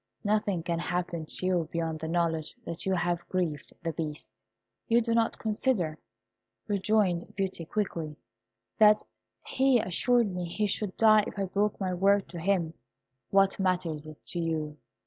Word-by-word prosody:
Nothing 205 -4 +1
can 170 0 -1
happen 175 -2 -2
to 185 - -3
you 175 -4 +1
beyond 165 -1 -2
the 160 - -4
knowledge 165 -2 0
that 170 +3 -5
you 190 - +2
have 175 0 -1
grieved 170 -6 -2
the 165 -1 -2
Beast." 150 -7 -5 0.5
"You 230 +1 +5
do 230 0 0
not 230 -1 +2
consider," 210 - 0 0.7
rejoined 200 -3 +1
Beauty, 190 -4 -2
quickly, 165 -6 -2 0.6
"that 210 -1 +6 0.4
he 265 -1 +3
assured 225 +2 +2
me 180 -1 -3
he 190 +5 -1
should 205 -1 -2
die 215 -1 +6
if - - -8
I 195 - 0
broke 200 +2 0
my 185 -2 -1
word 195 +2 +3
to 175 - -7
him." 170 -2 +1 0.6
"What 195 0 +3
matters 175 -5 0
it 155 -1 -10
to 175 - -4
you?" 155 -2 -2
180 Hz, 160 wpm, -29 LUFS, 165-205 Hz, 0.7 s, that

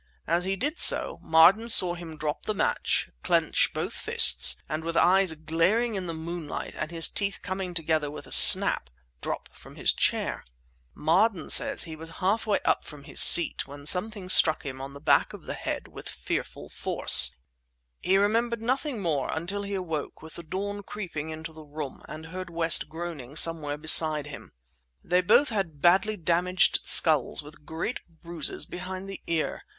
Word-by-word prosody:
As 170 +2 -2
he 195 +1 -2
did 290 - -1
so, - - +4
Marden 180 +8 +3
saw 180 -6 +5
him 170 -3 -11
drop 150 0 -5
the 215 - -2
match, - - -2
clench - - 0
both - - -5
fists, - - +2
and 155 +1 -5
with 165 0 -4
eyes 190 0 +2
glaring 170 +10 -1
in 190 -3 -5
the 165 - -5
moonlight 165 -1 -7
and 155 - -5
his 165 -1 +1
teeth 200 -1 -3
coming 185 -1 -6
together 155 -3 -2
with 150 - -10
a - - -15
snap, 60 - +5 0.3
drop - - -6
from - - -17
his - - +2
chair. - - -2 0.5
"Marden 180 +3 0
says - - +3
that - - -10
he 160 - -8
was 160 +1 -10
half 200 +4 -2
up 205 - -1
from 150 -2 -13
his - - -5
seat 170 - +8
when 145 0 -13
something 190 +4 +1
struck 160 -4 +4
him 130 -1 -8
on 135 +1 -9
the 140 - -12
back 150 - +1
of - - -12
the - - -6
head - - -6
with - - -11
fearful - - -6
force. - - +2 0.6
He 190 - 0
remembered 230 +3 -1
nothing 255 -2 -3
more 150 -6 -2
until 180 +6 -4
he 200 0 -6
awoke, 165 -6 -6
with 160 - -12
the - - -9
dawn 200 +5 -6
creeping 180 -7 -8
into 160 +1 -9
the 160 - -13
room, 150 -2 -9
and 155 +1 -10
heard 185 +2 -9
West 165 -2 +3
groaning 155 -5 -9
somewhere 155 -3 +1
beside 155 -1 +7
him. 145 -1 -12 0.5
They 180 +1 0
both 240 +10 +2
had 190 - -5
badly 190 +6 +1
damaged 175 +2 0
skulls 155 -1 +3
with 150 0 -15
great 165 +9 -5 0.2
bruises 170 -3 -2
behind 185 +1 -8
the 195 - -9
ear. 165 -2 -3
170 Hz, 175 wpm, -25 LUFS, 155-195 Hz, 0.6 s, seat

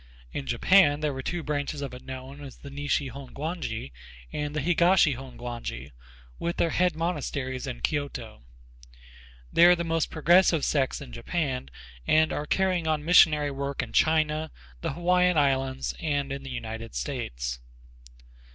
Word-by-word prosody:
In 135 - -4
Japan 145 +4 +4
there 150 -3 -1
are 130 - -4
two 175 +4 -3
branches 145 -1 -2
of 135 - -5
it 125 - -10
known 130 +2 -8
as 135 -3 -10
the 140 - -11
Nishi 145 -1 -1
Hongwanji 140 - -5 0.4
and 150 0 -3
the - - 0
Higashi 170 0 +4
Hongwanji 120 - -7 0.5
with 170 - -2
their 165 - +2
head 180 -2 +2
monasteries 140 -6 -3
in 125 -2 -6
Kyoto. 135 - -3 1.1
They 170 - +7
are 180 - +7
the 170 - -3
most 165 -1 0
progressive 165 0 +4
sects 135 -2 0
in 140 - -9
Japan 130 - -2 0.4
and 155 0 +4
are 150 - -3
carrying 185 -3 +1
on 155 -1 0
missionary 150 -4 +5
work 140 0 -3
in - - -9
China, 155 0 +2 0.3
the - - -2
Hawaiian 180 +1 +3
Islands 135 -2 +1
and 145 -3 -1
in 140 0 -4
the 135 - -8
United 115 - -6
States. - - -3
145 Hz, 150 wpm, -27 LUFS, 130-160 Hz, 1.1 s, They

